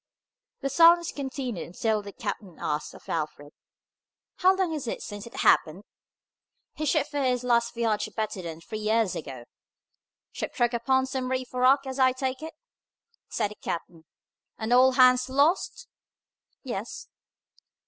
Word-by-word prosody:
The 275 - -1
silence 340 +1 +6
continued 265 - -5
until 215 +5 -1
the 200 0 -9
captain 195 -3 -6
asked 150 0 -3
of - - -16
Alfred, 150 -2 -4 0.8
"How 375 +1 +4
long 375 -4 0
is 290 -5 -4
it - - -4
since 205 +2 -7
it - - -13
happened?" 165 +6 +3 0.9
"He 305 - -3
shipped 300 0 +1
for 290 -1 -1
his 250 -2 +1
last 235 -1 +1
voyage 220 -3 0
better 215 -3 -3
than 165 -2 -7
three 215 +5 -6
years 215 -2 +1
ago." 130 -6 -7 0.9
"Ship - - -5
struck 240 -1 +1
upon 260 +3 +2
some 260 -1 -3
reef 255 -1 -3
or 250 - -2
rock, 270 +2 +5
as 265 0 -5
I 260 -1 +5
take 260 +1 -3
it," 320 0 -8 0.7
said 210 -3 -1
the - - -10
captain, 165 -1 -5 0.5
"and 220 +2 -1
all 255 +1 +6
hands 255 0 +5
lost?" 285 +7 +1 0.8
"Yes." - - -6
250 Hz, 155 wpm, -27 LUFS, 210-265 Hz, 0.9 s, silence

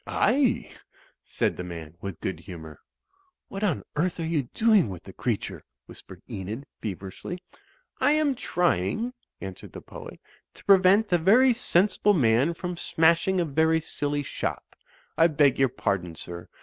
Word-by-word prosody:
"Aye," 265 -1 +2 0.5
said - - -1
the 90 - -4
man, 85 -3 -8
with 100 -4 -6
good 90 -4 -3
humour. 80 -4 -10 0.7
"What 195 +1 -5
on 190 -8 0
earth 170 +3 0
are 165 - -2
you 150 -6 -1
doing 215 - +4
with 90 -3 -8
the - - -11
creature?" - - -3 0.2
whispered - - -13
Enid, 105 +8 -6 0.2
feverishly. 100 - -6 0.6
"I 290 - +4
am 305 -2 +2
trying," 175 - 0 0.3
answered 95 -1 -8
the - - -8
poet, - - -10 0.4
"to - - -17
prevent 195 +2 +5
a 175 - +4
very 240 +9 +5
sensible 205 -1 +2
man 130 +3 +3
from 180 0 -5
smashing 170 +4 +2
a 175 - +2
very 160 +2 +2
silly 145 -2 -2
shop. - - -5 0.4
I 165 - +7
beg 145 -5 +3
your 135 -1 +4
pardon, 90 -7 -2
sir. 85 +1 -7
160 Hz, 150 wpm, -26 LUFS, -, 0.7 s, I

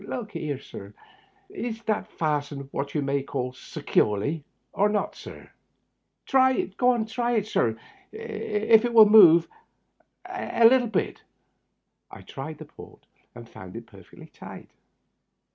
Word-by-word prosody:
Look 225 -4 -6
'ere, 145 -3 -3
sir, 100 -6 -12 0.5
is 230 -1 -6
that 215 -2 -2
fastened 145 -3 -3
what 140 +2 -5
you 150 - 0
may 140 0 -1
call 130 -2 -4
securely, 130 +3 -1 0.3
or 205 +2 +2
not, 210 0 -2
sir? - - -12 0.7
Try 260 -1 +3
it, 195 - -3
sir, 235 -1 0 1.0
see - - -11
if 215 +1 +1
it 240 -1 -2
wiU 220 -2 +8
move 175 -6 +7 0.8
a 240 +1 +2
hinch." 205 - -2 0.9
I - - -12
tried - - -8
the - - -10
port, - - -15 0.3
and 120 -1 -11
found 95 -4 -12
it 115 0 -8
perfectly 95 -5 -16
tight. - - -12
170 Hz, 125 wpm, -25 LUFS, 140-225 Hz, 1.0 s, wiU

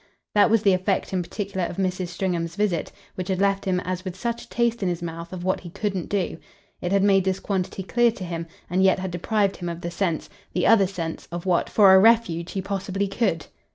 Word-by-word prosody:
That 205 +2 +5
was 225 -1 +3
the 200 -3 +5
effect 185 +1 0
in 185 - +1
particular 195 +1 -4
of - - -8
Mrs. 185 -1 -1
Stringham's 175 -2 -2
visit, 195 -6 0 0.2
which 185 -1 -5
had 190 -2 -1
left 195 0 +1
him 185 -1 +1
as 185 0 -4
with 185 -3 -5
such 235 +2 -2
a - - -28
taste 235 -1 0
in 190 - +1
his 175 0 -3
mouth 170 0 -6
of 180 -2 -6
what 185 +1 +1
he 175 - -9
couldn't 190 0 -3
do. 185 -5 -1 0.4
It 175 - -2
had 195 0 +3
made 195 -1 +4
this 190 0 0
quantity 190 -1 -2
clear 240 +5 +3
to 205 - -8
him, 170 -1 -4 0.2
and 180 +2 +1
yet 190 -1 +5
had 185 -1 -4
deprived 195 +3 0
him 175 -1 -4
of 170 0 -6
the 170 - -4
sense, 170 -2 -1 0.3
the 180 - +1
other 200 -4 +6
sense, 170 -4 -5
of 175 +1 -5
what, 180 -2 +1
for 200 -3 +6
a 190 - +8
refuge, 190 -6 +3
he 190 - -2
possibly 195 0 -2
COULD. 195 -5 0
190 Hz, 235 wpm, -24 LUFS, 175-200 Hz, 0.4 s, a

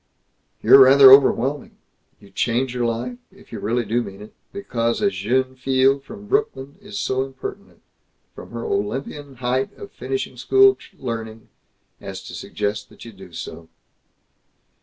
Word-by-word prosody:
"You're 135 - +8
rather 135 0 +9
overwhelming. 135 0 +4 0.4
You 100 - -18
change 120 +5 -1
your 120 -1 -1
life 120 +2 -4
if - - -20
you - - -6
really 120 +3 -1
do 115 +4 0
mean 100 -4 -9
it 105 - -14 0.2
because 115 -12 -2
a 205 -2 +1
jeune 130 - -1
fille 130 +1 +2
from 205 +9 -12
Brooklyn 145 - -2
is 100 - -8
so 130 +6 -1
impertinent, 135 0 -9 0.5
from - - -11
her 115 0 -6
Olympian 135 +7 -4
height 130 +2 -1
of 410 -1 -10
finishing 400 0 -5
school 395 0 +5 0.2
learning, 115 -3 -6 0.5
as - - -8
to - - -10
suggest 105 0 -4
that - - -14
you 115 - -9
do 95 -2 -14
so." 80 0 -9
125 Hz, 150 wpm, -21 LUFS, 115-135 Hz, 0.5 s, rather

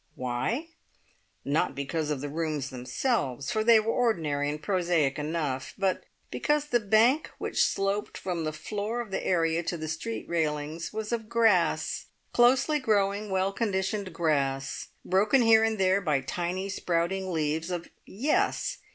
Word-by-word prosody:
Why? 130 - -2 0.8
Not 145 +3 +1
because 150 +2 -2
of 145 -3 -2
the 145 - -3
rooms 150 -3 -2
themselves, 130 - -1
for 215 - +1
they 230 0 +7
were 220 +1 0
ordinary 155 -12 +1
and 150 +1 -3
prosaic 170 -5 +1
enough, 150 -4 -3
but 195 -1 0 0.3
because 295 0 +1
the 245 -5 +2
bank 225 +8 +3
which - - +1
sloped 195 +1 -1
from 175 -3 -3
the 155 - -1
floor 210 +9 -4
of 220 -4 -9
the - - -2
area 165 -2 +1
to 170 0 -3
the 155 0 -5
street 160 +9 -4
railings 155 -1 -2
was 215 0 -4
of 225 -2 -3
grass, 185 -10 +2 0.3
closely 260 +5 +4
growing, 205 -3 +1
well 190 +1 0
conditioned 200 -2 -1
grass, 140 -5 -1 0.2
broken 210 +7 +3
here 225 -1 +6
and 225 -1 +1
there 190 +1 +3
by 150 -7 +1
tiny, 180 +7 -3
sprouting 185 0 -1
leaves 160 +1 -1
of 175 -2 -4 0.2
yes! 260 +10 0
185 Hz, 150 wpm, -28 LUFS, 155-215 Hz, 0.8 s, they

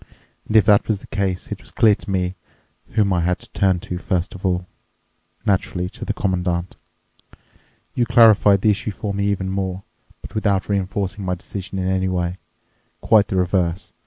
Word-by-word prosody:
And 110 - -3
if 110 - +7
that 105 -2 +4
was 110 -3 0
the - - -13
case, 95 -3 -3
it - - -5
was - - -16
clear 110 -2 +4
to 100 - -7
me 90 -1 0 0.6
whom 105 -3 +2
I 90 - +1
had 90 +1 +1
to - - -15
turn 95 -2 +2
to 90 -1 -5
first 90 -1 -2
of 95 - -11
all—naturally, 90 0 -3
to - - -10
the - - -1
Commandant. 90 -2 -1 1.2
You 120 -1 0
clarified 110 -4 +6
the 105 - +4
issue 105 +1 -2
for 100 0 -4
me 100 0 0
even 95 -2 -1
more, 95 0 -3 0.4
but - - -10
without 100 -3 0
reinforcing 100 +1 -2
my 90 -1 -1
decision 95 +2 -7
in 95 -1 -1
any 95 0 +1
way—quite 95 +3 -1
the - - -3
reverse. 90 -1 0
95 Hz, 175 wpm, -21 LUFS, 90-100 Hz, 1.2 s, if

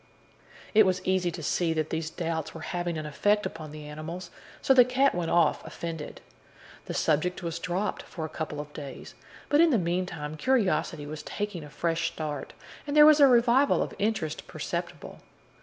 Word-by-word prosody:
It 215 -2 +6
was 185 0 -1
easy 185 -1 +1
to 165 -1 -7
see 165 +2 +1
that 155 -1 -2
these 160 -1 -2
doubts 165 -2 -4
were 165 - -7
having 175 0 -3
an 155 - -4
effect 205 +8 +1
upon 155 -2 -6
the 150 0 -9
animals, 165 +4 -7 0.3
so 270 - +4
the 255 -1 +8
cat 260 +3 +2
went 170 -2 -2
off 170 -3 +3
offended. 165 -2 -6 0.6
The - - -5
subject 175 +4 0
was 170 0 -3
dropped 185 +4 -2
for 160 - -6
a 155 - -10
couple 155 -2 -4
of 150 0 -7
days, 140 -3 -8 0.3
but 295 +2 +4
in 335 - +6
the 255 - +3
meantime 170 -4 -2
curiosity 195 - +1
was 150 +1 -6
taking 205 -4 -4
a 150 - -10
fresh 165 +2 -1
start, 150 -4 -5 0.3
and 290 +1 -1
there 300 - +10
was 305 0 +7
a 280 - +8
revival 245 +2 +4
of - - -6
interest 200 -7 -2
perceptible. - - -5
170 Hz, 185 wpm, -28 LUFS, 155-210 Hz, 0.6 s, there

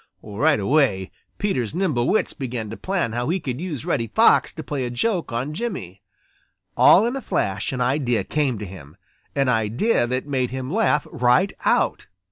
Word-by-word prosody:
Right 110 +6 +1
away, 105 -5 +1 0.3
Peter's 150 - -1
nimble 155 -11 0
wits 215 - +1
began 120 -6 -5
to - - -5
plan 185 - -2
how 120 +4 -2
he 185 +3 +1
could 130 -3 -4
use 160 -9 -5
Reddy 115 -4 0
Fox 105 - +4
to - - -7
play 140 -3 -3
a 125 - -2
joke 170 - -1
on 125 +6 -3
Jimmy. 150 - -5 0.7
All 200 - +6
in 240 +3 -1
a 270 - -4
flash 100 - -2
an 130 -1 -3
idea 125 -2 +1
came 140 -6 -1
to 105 - -6
him, 90 -4 -12 0.4
an 140 -1 +2
idea 120 - +1
that 130 +2 -2
made 130 -4 -1
him 130 +1 -5
laugh 225 +1 +2
right 130 +6 +2
out. - - +1
130 Hz, 180 wpm, -22 LUFS, 115-160 Hz, 0.7 s, All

